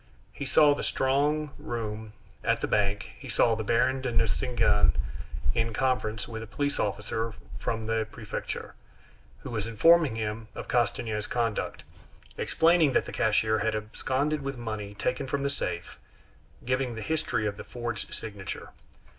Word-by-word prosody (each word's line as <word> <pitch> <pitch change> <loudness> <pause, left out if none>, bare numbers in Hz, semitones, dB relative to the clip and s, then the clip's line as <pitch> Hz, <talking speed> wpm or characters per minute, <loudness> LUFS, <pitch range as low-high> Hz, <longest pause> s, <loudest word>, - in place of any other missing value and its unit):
He 140 - -5
saw 150 +1 +6
the - - -3
strong 145 +3 +1
room 110 -2 -4 0.3
at - - +2
the - - 0
bank; 100 - +1
he - - -9
saw 115 - +4
the 110 0 -1
Baron 125 +4 +2
de 130 -2 -1
Nucingen 115 -2 +3 0.6
in 115 0 0
conference 115 -4 0
with 110 -1 -5
a 115 - -7
police 145 +5 -1
officer 105 +2 -1 0.2
from 110 -1 -2
the 110 0 0
prefecture, 110 -3 -5 0.7
who - - -6
was 110 -2 -2
informing 155 +4 +5
him 110 0 -3
of - - -6
Castanier's 110 -2 0
conduct, 115 -3 -1 0.5
explaining 165 -4 +4
that - - +3
the - - -7
cashier 110 0 +3
had 110 +1 +1
absconded 130 +7 -1
with 135 -1 -4
money 110 -3 -4
taken 125 +5 -1
from 140 +1 -1
the 140 - +1
safe, 85 -10 -4 0.7
giving 130 -1 0
the 110 - -5
history 155 -8 0
of 105 -1 -1
the - - -6
forged 120 -2 -5
signature. 100 -4 -6
115 Hz, 155 wpm, -28 LUFS, 110-130 Hz, 0.7 s, saw